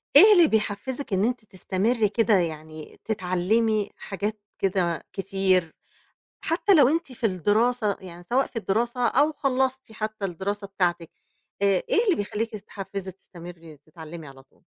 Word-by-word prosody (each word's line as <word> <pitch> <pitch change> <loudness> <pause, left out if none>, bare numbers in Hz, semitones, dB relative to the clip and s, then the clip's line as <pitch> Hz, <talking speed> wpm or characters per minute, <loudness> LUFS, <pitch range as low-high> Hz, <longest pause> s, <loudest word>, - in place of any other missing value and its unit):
إيه 425 +1 +10
اللي 345 -4 +6
بيحفزِك 220 +3 -2
إن 190 +2 +2
أنتِ 240 -2 -2
تستمري 205 +4 0
كده 220 +1 +2
يعني 155 -4 -3
تتعلمي 210 +2 0
حاجات 205 +2 -4 0.2
كده 185 -3 0
كتير، 190 -3 +1 0.7
حتى 365 +4 +2
لو 285 -7 +6
أنتِ 325 -2 -1
في 235 -2 -1
الدراسة 210 +3 +1
يعني 175 -2 -11
سواء 250 +9 +1
في - - -18
الدراسة 235 +3 0
أو 290 +6 +3
خلصتِ 265 -4 -1
حتى 215 -1 -5
الدراسة 195 +3 -3
بتاعتِك، 175 -4 -1 0.5
آآ، - - +4 0.2
إيه 445 - +3
اللي 400 -6 +3
بيخليكِ 210 +2 -3
تتحفزي، 195 -2 -7
تستمري، 170 -3 -12
تتعلمي 160 +1 -11
على 135 -1 -14
طول؟ 135 - -32
205 Hz, 140 wpm, -25 LUFS, 180-240 Hz, 0.7 s, إيه